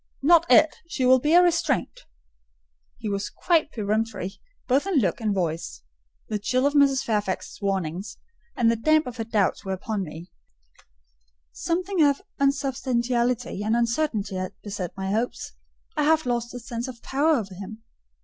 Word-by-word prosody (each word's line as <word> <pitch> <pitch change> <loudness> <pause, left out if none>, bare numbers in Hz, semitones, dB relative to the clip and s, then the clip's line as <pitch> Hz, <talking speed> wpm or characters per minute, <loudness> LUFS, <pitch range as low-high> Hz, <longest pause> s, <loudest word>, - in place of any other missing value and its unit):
"Not 335 +2 +5
it: 315 0 +5
she 265 -6 -1
will 260 +1 +6
be 300 +6 +2
a 355 - +8
restraint." 340 -5 0 0.9
He 230 - -6
was 200 0 -2
quite 325 -3 +1
peremptory, 210 -3 -2 0.3
both 275 +8 +2
in 390 - 0
look 220 - +1
and 215 -2 0
voice. 170 -4 -3 0.4
The 210 - -2
chill 255 +6 +1
of 285 - +2
Mrs. 275 -2 +4
Fairfax's 210 -3 -2
warnings, 190 -1 -2 0.4
and 230 -1 +3
the - - +1
damp 310 +7 +3
of 250 -1 -7
her 225 - -2
doubts 215 -3 0
were 195 - -3
upon 205 +2 -3
me: 165 0 -8 1.2
something 365 +1 -1
of 285 -2 +4 0.2
unsubstantiality 250 -5 0
and 220 +2 +1
uncertainty 235 -4 0
had 185 +1 -4
beset 195 -4 -4
my 190 0 -2
hopes. 225 +4 -2 0.4
I 305 - +1
half 315 0 +3
lost 240 -1 -1
the 245 - -7
sense 235 +1 -5
of 240 -3 -10
power 300 +4 +2
over 200 -7 -3
him. 205 +4 -9
235 Hz, 160 wpm, -25 LUFS, 205-285 Hz, 1.2 s, a